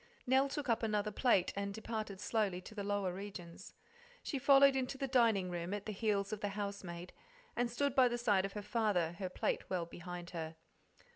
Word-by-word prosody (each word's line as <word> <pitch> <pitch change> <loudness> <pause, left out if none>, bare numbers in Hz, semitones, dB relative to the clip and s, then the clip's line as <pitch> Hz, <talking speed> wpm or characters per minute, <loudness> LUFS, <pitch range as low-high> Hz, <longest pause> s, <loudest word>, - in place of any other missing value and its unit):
Nell 265 +2 +4
took 290 0 -3
up 230 -2 +2
another 210 -1 0
plate, 200 -4 +3
and 200 0 -3
departed 215 -3 -4
slowly 205 -4 0
to 215 - -11
the 205 -2 -4
lower 200 -2 0
regions. 185 -3 -8 0.5
She 280 - -2
followed 275 0 +7
into 265 +1 -1
the 270 0 -2
dining 225 -8 +3
room 175 +3 -2
at 205 - -6
the 215 - -3
heels 205 -1 0
of 215 - -3
the 205 - 0
housemaid, 195 -4 -5 0.4
and 245 -1 +1
stood 280 +3 0
by 260 -2 +6
the 240 0 -1
side 205 -5 +3
of 195 0 -4
her 210 - -5
father, 205 -8 +1
her 185 -2 -2
plate - - -1
well 180 -3 -1
behind 175 +1 -8
her. 160 -2 -5
205 Hz, 200 wpm, -35 LUFS, 185-235 Hz, 0.5 s, followed